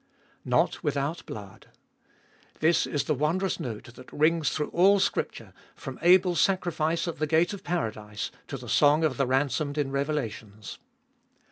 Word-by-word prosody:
Not -, -, +1 dB
without 140 Hz, +4 st, -2 dB
blood! 100 Hz, -2 st, -9 dB, 0.9 s
This 160 Hz, +2 st, +3 dB
is 145 Hz, -, -1 dB
the 150 Hz, -, 0 dB
wondrous 165 Hz, +7 st, 0 dB
note 120 Hz, 0 st, -6 dB
that 130 Hz, +1 st, -14 dB
rings 155 Hz, 0 st, +2 dB
through 150 Hz, -, -2 dB
all 195 Hz, +3 st, +4 dB
Scripture, -, -, -2 dB, 0.2 s
from 135 Hz, -1 st, -8 dB
Abel's 180 Hz, 0 st, +5 dB
sacrifice 170 Hz, -3 st, 0 dB
at 170 Hz, -, -5 dB
the 155 Hz, -, 0 dB
gate 165 Hz, +5 st, +2 dB
of 200 Hz, -, -8 dB
paradise 110 Hz, -11 st, -3 dB, 0.2 s
to 140 Hz, -, -5 dB
the 125 Hz, -1 st, -10 dB
song 145 Hz, +6 st, +4 dB
of 145 Hz, -6 st, +1 dB
the 135 Hz, -, +1 dB
ransomed 145 Hz, +3 st, 0 dB
in 140 Hz, -2 st, -1 dB
Revelations. 115 Hz, -8 st, -4 dB
150 Hz, 150 wpm, -27 LUFS, 130-170 Hz, 0.9 s, Abel's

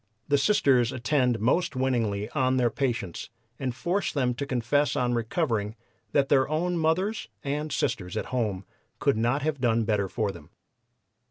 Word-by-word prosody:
The 145 Hz, -, +4 dB
Sisters 135 Hz, -, +3 dB
attend 125 Hz, -2 st, +1 dB
most 140 Hz, -, +1 dB
winningly 115 Hz, -6 st, 0 dB
on 130 Hz, -2 st, +1 dB
their 120 Hz, -2 st, +2 dB
patients 115 Hz, -10 st, -2 dB, 0.3 s
and 130 Hz, -3 st, -2 dB
force 175 Hz, +10 st, -1 dB
them 125 Hz, -4 st, +1 dB
to 140 Hz, +3 st, -4 dB
confess 130 Hz, +3 st, +1 dB
on 125 Hz, -1 st, +1 dB
recovering 115 Hz, -3 st, -1 dB, 0.4 s
that 140 Hz, +4 st, +3 dB
their 135 Hz, -1 st, +3 dB
own 175 Hz, +4 st, 0 dB
mothers 175 Hz, +7 st, 0 dB, 0.2 s
and 150 Hz, +2 st, -2 dB
sisters 100 Hz, -9 st, -2 dB
at -, -, -2 dB
home 105 Hz, -6 st, -1 dB, 0.3 s
could -, -, +2 dB
not 120 Hz, +6 st, +1 dB
have 150 Hz, -3 st, -1 dB
done 115 Hz, -2 st, +2 dB
better 105 Hz, -3 st, 0 dB
for 105 Hz, -1 st, -1 dB
them. 85 Hz, -5 st, -13 dB
125 Hz, 160 wpm, -27 LUFS, 115-145 Hz, 0.4 s, The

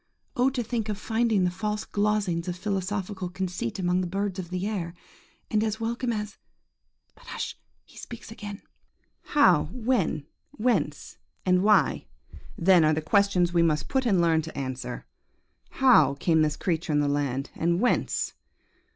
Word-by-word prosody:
Oh! 250 Hz, +2 st, +3 dB
to 255 Hz, -2 st, -2 dB
think 225 Hz, -1 st, -3 dB
of 210 Hz, -, -2 dB
finding 225 Hz, -2 st, +1 dB
the 180 Hz, -, +1 dB
false 210 Hz, +3 st, -3 dB
glozings 205 Hz, -5 st, 0 dB
of 180 Hz, -, -2 dB
philosophical 190 Hz, -1 st, -3 dB
conceit 180 Hz, -9 st, -3 dB
among 180 Hz, -1 st, +1 dB
the 180 Hz, -, -2 dB
birds 195 Hz, +1 st, -2 dB
of 175 Hz, -2 st, -6 dB
the 185 Hz, +1 st, -3 dB
air, 180 Hz, -5 st, -3 dB, 0.6 s
and 215 Hz, 0 st, +2 dB
as 220 Hz, 0 st, -2 dB
welcome 235 Hz, +2 st, -1 dB
as... 210 Hz, -2 st, -4 dB, 0.7 s
but -, -, -20 dB
hush! -, -, -5 dB, 0.3 s
he -, -, -19 dB
speaks 235 Hz, -2 st, -9 dB
again. 205 Hz, -2 st, -8 dB, 0.6 s
"How, 285 Hz, -, +4 dB
when, 225 Hz, -, 0 dB, 0.3 s
whence, 250 Hz, -3 st, -1 dB, 0.3 s
and 180 Hz, -1 st, +3 dB
why, 210 Hz, -, +3 dB, 0.5 s
then, 180 Hz, -1 st, +5 dB
are 155 Hz, 0 st, +4 dB
the 155 Hz, -, -1 dB
questions 180 Hz, -1 st, +2 dB
we 170 Hz, -, +4 dB
must 155 Hz, -2 st, +1 dB
put 265 Hz, -2 st, +1 dB
and 195 Hz, -5 st, +3 dB
learn 165 Hz, -2 st, +3 dB
to 160 Hz, +1 st, -9 dB
answer. 130 Hz, -2 st, -5 dB, 0.6 s
How 255 Hz, -, +5 dB
came 160 Hz, +3 st, +2 dB
this 150 Hz, -1 st, +1 dB
creature 170 Hz, -3 st, -1 dB
in 145 Hz, -, +3 dB
the 145 Hz, -, +2 dB
land, 140 Hz, -1 st, -1 dB
and 170 Hz, +1 st, +1 dB
whence? 245 Hz, +3 st, 0 dB
190 Hz, 160 wpm, -26 LUFS, 170-215 Hz, 0.7 s, then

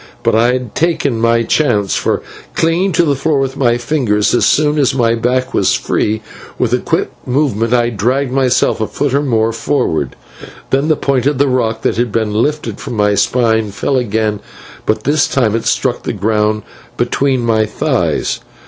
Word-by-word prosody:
But -, -, +2 dB
I 115 Hz, +3 st, +3 dB
had 125 Hz, -3 st, -4 dB
taken 150 Hz, -8 st, 0 dB
my 115 Hz, 0 st, +2 dB
chance, 110 Hz, -8 st, +1 dB
for, -, -, -1 dB, 0.3 s
clinging 170 Hz, +4 st, +1 dB
to 175 Hz, -, +3 dB
the 145 Hz, -2 st, +1 dB
floor 150 Hz, +2 st, 0 dB
with 135 Hz, 0 st, -1 dB
my 120 Hz, -3 st, +2 dB
fingers, 120 Hz, -5 st, 0 dB
so 120 Hz, -, +2 dB
soon 150 Hz, 0 st, +2 dB
as 135 Hz, -2 st, +2 dB
my 115 Hz, -3 st, +2 dB
back 125 Hz, +2 st, -1 dB
was -, -, +2 dB
free, 110 Hz, +1 st, -1 dB, 0.3 s
with -, -, 0 dB
a -, -, +3 dB
quick -, -, -1 dB, 0.2 s
movement 125 Hz, -4 st, 0 dB
I 120 Hz, -1 st, +2 dB
dragged 125 Hz, +5 st, 0 dB
myself 130 Hz, -3 st, +1 dB
a 110 Hz, -, 0 dB
foot 145 Hz, -2 st, -2 dB
or 140 Hz, -, +2 dB
more 115 Hz, -5 st, +1 dB
forward. 115 Hz, -, -1 dB, 0.6 s
Then 135 Hz, +3 st, +2 dB
the 155 Hz, -, +3 dB
point 135 Hz, -2 st, 0 dB
of 145 Hz, -2 st, 0 dB
rock 125 Hz, -5 st, 0 dB
that -, -, 0 dB
had 120 Hz, -1 st, 0 dB
been 110 Hz, -1 st, -1 dB
lifted 150 Hz, +8 st, -1 dB
from 135 Hz, -3 st, -6 dB
my 105 Hz, -1 st, +2 dB
spine 110 Hz, +1 st, +1 dB
fell 120 Hz, +7 st, -2 dB
again, 110 Hz, -3 st, -1 dB, 0.5 s
but 110 Hz, -, 0 dB
this 145 Hz, +2 st, +2 dB
time 115 Hz, -5 st, +1 dB
it 115 Hz, 0 st, -2 dB
struck 125 Hz, +1 st, 0 dB
the -, -, -3 dB
ground 105 Hz, +1 st, 0 dB, 0.3 s
between 135 Hz, -2 st, 0 dB
my 110 Hz, -2 st, +1 dB
thighs. -, -, -1 dB
120 Hz, 185 wpm, -15 LUFS, 110-140 Hz, 0.6 s, I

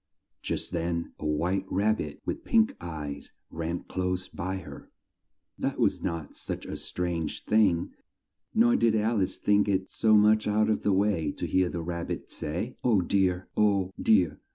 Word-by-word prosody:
Just -, -, -3 dB
then 85 Hz, 0 st, -2 dB
a 75 Hz, -, -3 dB
white 90 Hz, +6 st, 0 dB
rab 110 Hz, +3 st, +2 dB
bit 75 Hz, -6 st, -6 dB
with -, -, -3 dB
pink 110 Hz, -1 st, +3 dB
eyes 75 Hz, -4 st, -6 dB, 0.2 s
ran 85 Hz, +1 st, -3 dB
close 90 Hz, 0 st, -2 dB
by 95 Hz, +2 st, -4 dB
her. 75 Hz, -7 st, -9 dB, 0.7 s
That -, -, -1 dB
was -, -, +1 dB
not 80 Hz, -3 st, -4 dB
such -, -, -5 dB
a -, -, -5 dB
strange 85 Hz, -3 st, -3 dB
thing, 100 Hz, -6 st, +3 dB, 0.6 s
nor 240 Hz, +2 st, +4 dB
did 115 Hz, -, +3 dB
Alice 110 Hz, -3 st, +1 dB
think 105 Hz, 0 st, +3 dB
it 95 Hz, -1 st, 0 dB
so 110 Hz, -1 st, +4 dB
much 105 Hz, +1 st, +4 dB
out 105 Hz, +1 st, +2 dB
of 110 Hz, -, 0 dB
the 105 Hz, -, +1 dB
way 95 Hz, -6 st, +1 dB
to -, -, -4 dB
hear 95 Hz, -1 st, +2 dB
the 85 Hz, -1 st, -4 dB
Rab 85 Hz, 0 st, -4 dB
bit -, -, -5 dB
say, 90 Hz, +11 st, -4 dB
"Oh 110 Hz, -6 st, +4 dB
dear! 90 Hz, 0 st, +1 dB
Oh, 100 Hz, -3 st, +2 dB
dear! 95 Hz, -8 st, +3 dB
95 Hz, 170 wpm, -28 LUFS, 85-105 Hz, 0.7 s, nor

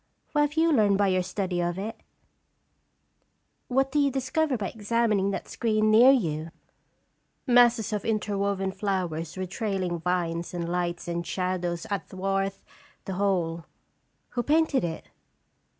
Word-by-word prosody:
" -, -, -43 dB
What 295 Hz, -, +2 dB
have 295 Hz, 0 st, +1 dB
you 330 Hz, +1 st, +3 dB
learned 210 Hz, -8 st, +4 dB
by 200 Hz, -1 st, +3 dB
your 185 Hz, 0 st, +2 dB
study 180 Hz, -1 st, -2 dB
of 175 Hz, 0 st, -1 dB
it?" 215 Hz, +4 st, -5 dB, 1.7 s
"What 265 Hz, +1 st, +1 dB
do 295 Hz, -, +2 dB
you 285 Hz, -1 st, +4 dB
discover 270 Hz, +2 st, 0 dB
by 200 Hz, -3 st, -3 dB
examining 215 Hz, -2 st, +1 dB
that 195 Hz, -, -4 dB
screen 215 Hz, -2 st, +1 dB
near 235 Hz, +4 st, +8 dB
you?" 165 Hz, -, +1 dB, 0.5 s
" -, -, -46 dB
Masses 240 Hz, -3 st, +4 dB
of 210 Hz, -, -2 dB
interwoven 200 Hz, -3 st, -1 dB
flowers 185 Hz, -5 st, -3 dB
with 185 Hz, -1 st, -4 dB
trailing 190 Hz, -5 st, -2 dB
vines 170 Hz, 0 st, -2 dB
and 170 Hz, -1 st, -3 dB
lights 175 Hz, 0 st, -2 dB
and 170 Hz, 0 st, -2 dB
shadows 180 Hz, -1 st, -2 dB
athwart 195 Hz, 0 st, -2 dB, 0.5 s
the 190 Hz, -, -4 dB
whole. 180 Hz, -4 st, 0 dB, 0.6 s
Who 240 Hz, -, -2 dB
painted 305 Hz, -, +2 dB
it?" 165 Hz, -2 st, -4 dB
195 Hz, 145 wpm, -27 LUFS, 180-230 Hz, 1.7 s, near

